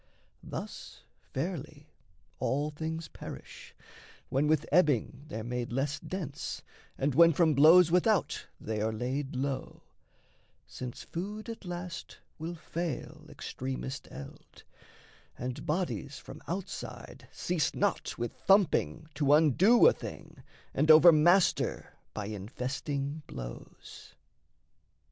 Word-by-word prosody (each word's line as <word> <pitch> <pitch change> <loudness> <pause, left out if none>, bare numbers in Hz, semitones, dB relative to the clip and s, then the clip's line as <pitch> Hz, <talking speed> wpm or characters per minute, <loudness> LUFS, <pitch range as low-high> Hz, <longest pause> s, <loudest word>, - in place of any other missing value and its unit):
Thus, - - -8 0.3
fairly, - - -5 0.5
all 145 +3 0
things 160 +1 -4
perish, - - -10 0.5
when 140 +3 +2
with 155 -1 +2
ebbing 145 -4 +2
They're 110 -8 -5
made 120 0 -3
less 135 +4 -1
dense 160 -7 -5 0.3
and 140 +1 0
when 165 +3 +7
from 160 0 +4
blows 160 +4 +7
without 180 +1 +2
They 110 -1 -3
are 110 +1 +1
laid 130 +5 -3
low; 135 +1 -3 0.8
since 125 -2 -7
food 210 +6 -5
at 225 -3 -7
last 175 -1 -6 0.2
will 165 +2 -4
fail 165 -2 -5
Extremest 130 +1 -5
eld, 70 0 -11 0.7
and 125 0 -5
bodies 150 -4 -2
from - - -11
outside 185 +2 -6
Cease 175 -3 -1
not 200 -1 0
with 120 -1 -3
thumping 175 -5 +2
to 145 0 +3
undo 170 - +5
a 485 - +8
thing - - -9 0.3
And 155 - +1
overmaster 170 +3 +6 0.2
by 105 - -3
infesting 135 +8 -4
blows. - - -10
150 Hz, 110 wpm, -30 LUFS, 130-175 Hz, 0.8 s, a